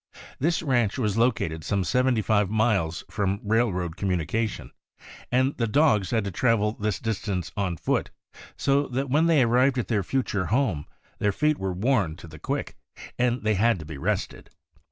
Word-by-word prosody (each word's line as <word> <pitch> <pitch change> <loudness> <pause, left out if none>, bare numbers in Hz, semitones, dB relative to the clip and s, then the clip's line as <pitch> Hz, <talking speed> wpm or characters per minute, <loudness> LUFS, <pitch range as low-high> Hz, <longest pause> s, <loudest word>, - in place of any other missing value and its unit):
This 165 +4 +1
ranch 120 -8 +1
was 105 -6 0
located 85 -9 0
some 100 +3 0
seventy 125 +2 +1
five 105 -1 +2
miles 105 -7 +1
from 100 -1 -1
railroad 100 -6 0
communication, 95 +3 -2 0.6
and 130 +3 +2
the 115 - 0
dogs 110 - +3
had 115 -3 +1
to 100 - -4
travel 105 +1 +2
this 105 -2 -2
distance 105 -5 -3
on 95 -4 -1
foot; - - -1 0.5
so 140 +1 +2
that 130 +1 -3
when 155 +4 +3
they 155 -6 +5
arrived 125 +3 +3
at 125 - -2
their 110 -4 +2
future 105 -3 -1
home 110 - 0 0.3
their 105 - +2
feet 150 +8 +1
were 95 -1 -2
worn 95 -4 +1
to 85 - -12
the 80 -1 -12
quick, - - -3 0.4
and 125 -1 +1
they 110 0 +2
had 115 +2 +3
to 80 - -9
be 75 -2 -8
rested. - - -3
110 Hz, 175 wpm, -26 LUFS, 95-125 Hz, 0.6 s, they